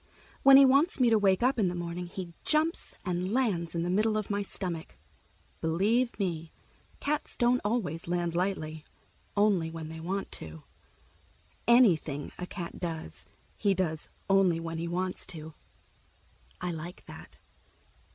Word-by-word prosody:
When 275 Hz, 0 st, +9 dB
he 275 Hz, -, +9 dB
wants 280 Hz, +6 st, +4 dB
me 245 Hz, -2 st, +4 dB
to 220 Hz, -, +5 dB
wake 195 Hz, +1 st, +3 dB
up 255 Hz, 0 st, +3 dB
in 200 Hz, -, +3 dB
the 180 Hz, -, -2 dB
morning, 175 Hz, 0 st, -4 dB
he 175 Hz, -1 st, -7 dB
jumps 315 Hz, +2 st, +1 dB
and 180 Hz, +1 st, -1 dB
lands 200 Hz, -10 st, 0 dB
in 170 Hz, -, 0 dB
the 175 Hz, -, -1 dB
middle 215 Hz, +3 st, +2 dB
of 215 Hz, -1 st, -3 dB
my 200 Hz, 0 st, 0 dB
stomach. 180 Hz, -4 st, -4 dB, 0.6 s
Believe 210 Hz, +10 st, +1 dB
me, 165 Hz, -5 st, -2 dB, 0.5 s
cats 295 Hz, +1 st, -2 dB
don't 245 Hz, +1 st, +3 dB
always 205 Hz, -8 st, -1 dB
land 175 Hz, -1 st, -1 dB
lightly—only 180 Hz, +2 st, -1 dB
when 160 Hz, -1 st, -7 dB
they 160 Hz, 0 st, -7 dB
want 190 Hz, +4 st, -3 dB
to. 80 Hz, -1 st, -9 dB, 1.0 s
Anything 170 Hz, -, +4 dB
a 180 Hz, -, -4 dB
cat 175 Hz, -2 st, -6 dB
does, 155 Hz, -, -5 dB, 0.3 s
he 200 Hz, -2 st, +1 dB
does 160 Hz, -4 st, -2 dB, 0.2 s
only 195 Hz, -4 st, +4 dB
when 165 Hz, 0 st, -4 dB
he 170 Hz, -, -3 dB
wants 180 Hz, +2 st, -2 dB
to. 160 Hz, -3 st, -8 dB, 1.1 s
I 180 Hz, 0 st, -2 dB
like 170 Hz, +2 st, -7 dB
that. -, -, -12 dB
180 Hz, 150 wpm, -29 LUFS, 165-215 Hz, 1.1 s, When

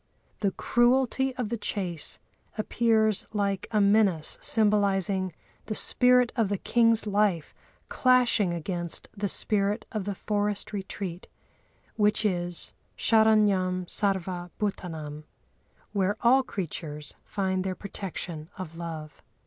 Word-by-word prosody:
The 200 Hz, -, +2 dB
cruelty 260 Hz, +2 st, +2 dB
of 245 Hz, -4 st, -3 dB
the 235 Hz, -1 st, -3 dB
chase 180 Hz, -7 st, -3 dB, 0.4 s
appears 220 Hz, -1 st, +1 dB
like 200 Hz, -2 st, -1 dB
a 215 Hz, -, +1 dB
menace 200 Hz, -6 st, +3 dB
symbolising 200 Hz, -3 st, +2 dB, 0.4 s
the 215 Hz, -, -2 dB
spirit 250 Hz, +1 st, +4 dB
of 225 Hz, -5 st, +1 dB
the 200 Hz, -, 0 dB
king's 230 Hz, +1 st, +3 dB
life 205 Hz, -6 st, +1 dB, 0.3 s
clashing 250 Hz, -7 st, +3 dB
against 175 Hz, 0 st, -4 dB
the 205 Hz, 0 st, -1 dB
spirit 205 Hz, +2 st, +1 dB
of 210 Hz, -4 st, -3 dB
the 200 Hz, -1 st, -3 dB
forest 205 Hz, +1 st, -2 dB
retreat, 190 Hz, -3 st, -5 dB, 0.7 s
which 210 Hz, 0 st, +2 dB
is 175 Hz, -3 st, -1 dB, 0.2 s
"sharanyam 205 Hz, -5 st, +3 dB
sarva 185 Hz, -2 st, 0 dB
bhútânâm" 160 Hz, -7 st, -4 dB, 0.7 s
(where 200 Hz, +1 st, +1 dB
all 255 Hz, +3 st, +5 dB
creatures 155 Hz, -, -5 dB
find 190 Hz, -2 st, -1 dB
their 190 Hz, -1 st, -2 dB
protection 180 Hz, -5 st, -6 dB
of 165 Hz, -3 st, -7 dB
love). 160 Hz, -3 st, -7 dB
200 Hz, 115 wpm, -27 LUFS, 180-220 Hz, 0.7 s, all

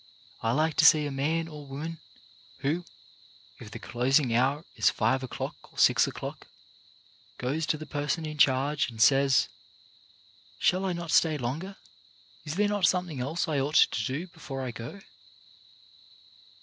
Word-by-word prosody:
I 115 Hz, -, +1 dB
like 155 Hz, +3 st, +1 dB
to -, -, +5 dB
see 150 Hz, 0 st, +7 dB
a 145 Hz, -, -3 dB
man 160 Hz, +5 st, -1 dB
or 150 Hz, -3 st, -10 dB
woman 155 Hz, +4 st, -6 dB, 0.6 s
who, 165 Hz, +6 st, -1 dB, 0.7 s
if 115 Hz, -, -10 dB
the -, -, -8 dB
closing 125 Hz, +1 st, +1 dB
hour 135 Hz, +6 st, +1 dB
is -, -, +4 dB
five 130 Hz, 0 st, +1 dB
o'clock 130 Hz, -, -7 dB
or -, -, -22 dB
six -, -, +5 dB
o'clock, -, -, -7 dB, 0.9 s
goes 150 Hz, +6 st, -2 dB
to 155 Hz, -, +1 dB
the 155 Hz, -, -8 dB
person 150 Hz, +2 st, -2 dB
in 155 Hz, -1 st, -6 dB
charge 140 Hz, +2 st, +3 dB
and 115 Hz, -2 st, -11 dB
says: 135 Hz, +3 st, +4 dB, 0.5 s
" 100 Hz, 0 st, -29 dB
Shall 185 Hz, -, +2 dB
I 185 Hz, -, 0 dB
not 170 Hz, -1 st, -5 dB
stay 155 Hz, -2 st, +4 dB
longer? 150 Hz, +10 st, -4 dB, 0.7 s
Is 155 Hz, +1 st, -4 dB
there 205 Hz, +2 st, +2 dB
not 205 Hz, -4 st, +2 dB
something 180 Hz, -6 st, -1 dB
else 140 Hz, +7 st, -2 dB
I 150 Hz, -3 st, 0 dB
ought 145 Hz, +3 st, -2 dB
to 115 Hz, -, +4 dB
do 135 Hz, -, -3 dB
before 150 Hz, -6 st, -7 dB
I 125 Hz, -, -3 dB
go 120 Hz, -, -8 dB
145 Hz, 160 wpm, -28 LUFS, 130-165 Hz, 0.9 s, see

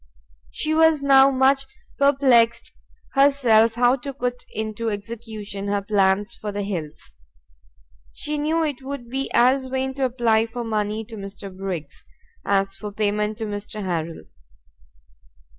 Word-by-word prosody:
She 310 Hz, -, -2 dB
was 320 Hz, -2 st, +4 dB
now 270 Hz, -1 st, +7 dB
much 270 Hz, +1 st, +2 dB, 0.3 s
perplext 250 Hz, -5 st, +3 dB, 0.4 s
herself 250 Hz, -6 st, +4 dB
how 245 Hz, +2 st, +3 dB
to 275 Hz, +2 st, -6 dB
put 245 Hz, -1 st, -3 dB
into 220 Hz, +1 st, -3 dB
execution 210 Hz, -1 st, -6 dB
her 200 Hz, 0 st, -1 dB
plans 200 Hz, +1 st, +1 dB
for 215 Hz, -2 st, -6 dB
the 205 Hz, 0 st, -3 dB
Hills: 165 Hz, -, -6 dB, 1.0 s
she 300 Hz, 0 st, -3 dB
knew 320 Hz, +2 st, +1 dB
it 285 Hz, -4 st, -3 dB
would 265 Hz, -3 st, -7 dB
be 270 Hz, +1 st, -2 dB
as 260 Hz, +2 st, +3 dB
vain 265 Hz, 0 st, -2 dB
to 270 Hz, 0 st, -1 dB
apply 230 Hz, -3 st, +2 dB
for 240 Hz, +1 st, -5 dB
money 215 Hz, -1 st, -2 dB
to 225 Hz, 0 st, -10 dB
Mr. 195 Hz, -1 st, -8 dB
Briggs, 180 Hz, -7 st, -5 dB, 0.4 s
as 195 Hz, -1 st, +1 dB
for 205 Hz, +1 st, -7 dB
payment 210 Hz, +1 st, -1 dB
to 225 Hz, -, -4 dB
Mr. 210 Hz, 0 st, -5 dB
Harrel. 165 Hz, -2 st, -3 dB
225 Hz, 140 wpm, -23 LUFS, 205-265 Hz, 1.0 s, now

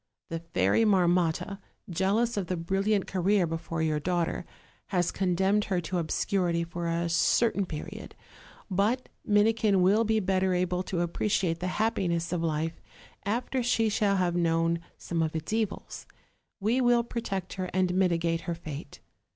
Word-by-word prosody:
The 165 Hz, -, -3 dB
Fairy 160 Hz, -, +1 dB
Marmotta, 180 Hz, -1 st, +2 dB, 0.3 s
jealous 200 Hz, +7 st, +1 dB
of 200 Hz, -4 st, -2 dB
the 180 Hz, -, -2 dB
brillant 195 Hz, +4 st, 0 dB
career 190 Hz, 0 st, +2 dB
before 165 Hz, 0 st, -3 dB
your 155 Hz, -1 st, +1 dB
daughter, 175 Hz, +1 st, -1 dB, 0.4 s
has 180 Hz, -3 st, +1 dB
condemned 190 Hz, +2 st, +1 dB
her 185 Hz, -3 st, 0 dB
to 175 Hz, +2 st, -2 dB
obscurity 170 Hz, +1 st, 0 dB
for 170 Hz, 0 st, -4 dB
a 170 Hz, +1 st, 0 dB
certain 195 Hz, +4 st, +2 dB
period; 155 Hz, -2 st, -7 dB, 0.5 s
but 210 Hz, +7 st, 0 dB
Minikin 210 Hz, -2 st, +3 dB
will 205 Hz, +5 st, +4 dB
be 220 Hz, 0 st, +2 dB
better 190 Hz, -1 st, +1 dB
able 180 Hz, 0 st, 0 dB
to 180 Hz, -1 st, -2 dB
appreciate 175 Hz, -1 st, 0 dB
the 180 Hz, -, -2 dB
happiness 180 Hz, -6 st, 0 dB
of 175 Hz, -, -1 dB
life 160 Hz, 0 st, -2 dB, 0.5 s
after 245 Hz, +4 st, -1 dB
she 225 Hz, -2 st, +2 dB
shall 205 Hz, -1 st, +2 dB
have 180 Hz, -2 st, +1 dB
known 165 Hz, -1 st, +2 dB, 0.2 s
some 170 Hz, -1 st, -2 dB
of 160 Hz, 0 st, -1 dB
its 160 Hz, +6 st, -3 dB
evils: 220 Hz, -3 st, -3 dB, 0.5 s
we 225 Hz, +6 st, +1 dB
will 240 Hz, -1 st, +4 dB
protect 200 Hz, -6 st, -4 dB
her 185 Hz, -1 st, -4 dB
and 185 Hz, -1 st, +1 dB
mitigate 170 Hz, -3 st, +1 dB
her 170 Hz, -, -1 dB
fate. 155 Hz, -3 st, -8 dB
180 Hz, 150 wpm, -28 LUFS, 170-205 Hz, 0.5 s, will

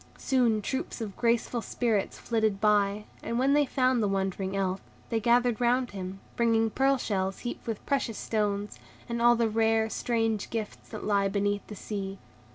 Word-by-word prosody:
Soon 235 Hz, -5 st, +2 dB
troops 265 Hz, +4 st, -3 dB
of 210 Hz, -4 st, -5 dB
graceful 235 Hz, 0 st, +1 dB
Spirits 225 Hz, -4 st, -1 dB
flitted 220 Hz, -4 st, 0 dB
by, 210 Hz, -1 st, +2 dB, 0.2 s
and 235 Hz, -, -2 dB
when 270 Hz, +3 st, +3 dB
they 290 Hz, -1 st, +4 dB
found 255 Hz, -2 st, +2 dB
the 210 Hz, -, +2 dB
wondering 195 Hz, 0 st, -1 dB
Elf, 190 Hz, -1 st, -1 dB, 0.3 s
they 225 Hz, -, +2 dB
gathered 240 Hz, +1 st, +3 dB
round 245 Hz, +1 st, +2 dB
him, 190 Hz, -1 st, -6 dB, 0.2 s
bringing 225 Hz, -1 st, +2 dB
pearl 270 Hz, +4 st, +3 dB
shells 195 Hz, -5 st, -2 dB
heaped 240 Hz, -, -6 dB
with 225 Hz, -3 st, -4 dB
precious 265 Hz, -6 st, 0 dB
stones, 205 Hz, -2 st, -2 dB, 0.3 s
and 235 Hz, 0 st, -2 dB
all 240 Hz, 0 st, +6 dB
the 230 Hz, -1 st, +2 dB
rare, 225 Hz, 0 st, +2 dB
strange 225 Hz, -3 st, 0 dB
gifts 220 Hz, -2 st, -5 dB
that 215 Hz, -, -7 dB
lie 200 Hz, -1 st, +2 dB
beneath 205 Hz, 0 st, -1 dB
the 210 Hz, -, -8 dB
sea. 195 Hz, -1 st, -5 dB
220 Hz, 170 wpm, -28 LUFS, 200-240 Hz, 0.3 s, all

